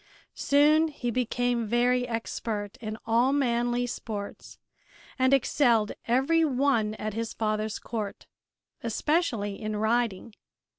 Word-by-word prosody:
Soon 300 +3 +4
he 255 -6 -4
became 245 -1 0
very 245 +2 +2
expert 225 -3 -4
in 215 -1 -6
all 235 +3 +3
manly 240 -3 +1
sports 210 -4 -6 0.6
and 260 0 +3
excelled 240 -5 +3 0.2
every 270 +8 +3
one 255 -7 +1
at 215 -1 -4
his 230 +1 -3
father's 215 -1 -1
court, 215 -4 -5 0.6
especially 230 - -1
in 215 0 -3
riding. 220 -1 0
235 Hz, 110 wpm, -27 LUFS, 215-255 Hz, 0.6 s, Soon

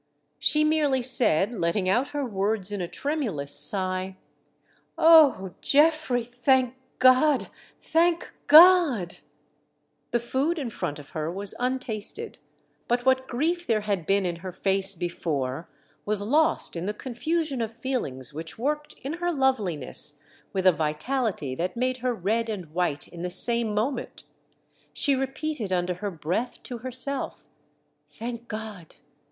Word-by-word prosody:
She 305 0 +3
merely 300 -4 +1
said, 235 - +6
letting 185 -1 -1
out 245 +9 +1
her 290 -2 -4
words 205 -2 -1
in 205 -2 -4
a 175 - -3
tremulous 215 - -3
sigh: 185 -2 +4 0.4
" - - -40
O 295 - +5
Geoffrey, 295 -4 +2
thank 250 +1 +1 0.2
God! 255 +2 +4 0.3
thank 335 +1 0
God 310 - +6 0.5
!" - - -47
The 240 - 0
food 270 +8 -1
in 265 -7 -4
front 145 - -4
of 145 -2 -13
her 155 +1 -4
was 195 +2 -4
untasted; 255 - -3 0.5
but 245 +1 -1
what 260 0 +2
grief 335 +8 -2
there 220 -2 +1
had 200 -6 -3
been 195 0 +1
in 175 -1 -3
her 185 +2 -8
face 195 +1 0
before 160 -4 -4 0.3
was 210 0 0
lost 310 - +2
in 170 +2 -4
the 210 - -3
confusion 275 +3 -3
of 225 -1 -3
feelinofs 225 - -3
which 160 +5 -8
worked 295 +5 -3
in 275 +3 -4
her 350 0 0
loveliness 195 - 0 0.3
with 190 -1 -3
a 185 - +7
vitality 160 - -2
that 180 - -4
made 255 +1 -1
her 250 -1 -2
red 225 +4 -1
and 185 -8 -6
white 170 -5 -2
in 170 - -11
the 180 - -3
same 230 +3 +1
moment. 245 +7 -3 0.7
She 280 - +2
repeated 270 -4 -3
under 180 0 0
her 205 +4 -5
breath 180 +8 -4
to 245 -2 -7
herself: 255 +3 0 0.6
"Thank 235 +1 -8
God! 215 -6 -8
230 Hz, 145 wpm, -25 LUFS, 185-270 Hz, 0.7 s, a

